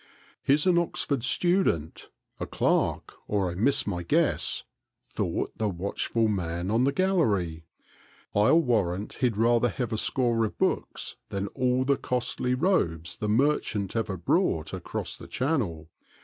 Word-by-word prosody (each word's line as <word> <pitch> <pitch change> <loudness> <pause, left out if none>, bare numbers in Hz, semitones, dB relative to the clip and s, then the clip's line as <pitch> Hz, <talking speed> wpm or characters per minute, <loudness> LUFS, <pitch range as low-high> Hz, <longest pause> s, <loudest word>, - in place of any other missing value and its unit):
" - - -31
He 140 - +6
's 150 - -2
an 180 -2 +4
Oxford 145 -5 -1
student, 135 - +1 0.3
a - - -3
clerk, - - 0
or 100 -4 0
I - - -6
miss 115 +10 +2
my 90 -4 -2
guess," 85 - +1 0.4
thought - - -3
the 110 -1 +1
watchful 100 +5 -1
man 90 -2 -2
on 115 +3 +3
the 140 - +3
gallery. 105 - +1 0.3
" - - -29
I 105 +1 +4
'11 165 +1 +5
warrant 105 -5 0
he 125 - +4
'd 110 - -7
rather 120 +2 +3
have 120 0 -3
a 110 - 0
score 120 -3 +1
of 110 - -3
books - - -2
than 100 0 -3
all 130 +1 0
the 140 0 +2
costly 125 0 -1
robes 90 - 0
the 105 - -2
merchant 110 -5 +1
ever 105 -4 -1
brought 85 - 0
across - - -4
the - - -11
Channel. 115 - -1
115 Hz, 165 wpm, -27 LUFS, 95-135 Hz, 0.4 s, He